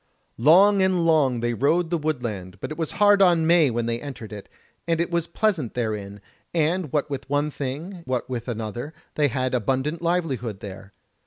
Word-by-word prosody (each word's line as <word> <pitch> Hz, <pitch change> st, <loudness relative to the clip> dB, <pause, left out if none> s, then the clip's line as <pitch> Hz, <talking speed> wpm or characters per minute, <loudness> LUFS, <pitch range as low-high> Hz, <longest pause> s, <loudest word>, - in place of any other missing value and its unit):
Long 190 Hz, -, +6 dB
and 185 Hz, -3 st, +2 dB
long 140 Hz, -7 st, +3 dB
they 120 Hz, 0 st, 0 dB
rode 160 Hz, +8 st, +1 dB
the 170 Hz, -, +2 dB
woodland, 115 Hz, -, -4 dB
but -, -, -6 dB
it 155 Hz, -, -5 dB
was 160 Hz, -, -2 dB
hard 205 Hz, -1 st, +5 dB
on 170 Hz, -4 st, +5 dB
May 165 Hz, -3 st, +5 dB
when 120 Hz, -1 st, -1 dB
they 115 Hz, 0 st, -2 dB
entered 125 Hz, -7 st, -8 dB
it, 100 Hz, -1 st, -9 dB, 0.4 s
and 165 Hz, -1 st, +1 dB
it 170 Hz, +1 st, -1 dB
was 170 Hz, -1 st, 0 dB
pleasant 170 Hz, -, -1 dB
therein, 105 Hz, -4 st, -3 dB, 0.3 s
and 165 Hz, -1 st, +1 dB
what 150 Hz, -1 st, 0 dB
with 140 Hz, -1 st, -6 dB
one 145 Hz, +1 st, 0 dB
thing, 150 Hz, +8 st, -5 dB
what 125 Hz, -2 st, -2 dB
with 125 Hz, -2 st, -5 dB
another, 120 Hz, +6 st, -5 dB, 0.2 s
they 150 Hz, -1 st, +2 dB
had 130 Hz, 0 st, -2 dB
abundant 135 Hz, +7 st, -1 dB
livelihood 140 Hz, -, -1 dB
there. 100 Hz, -1 st, -9 dB
145 Hz, 185 wpm, -24 LUFS, 120-170 Hz, 0.4 s, Long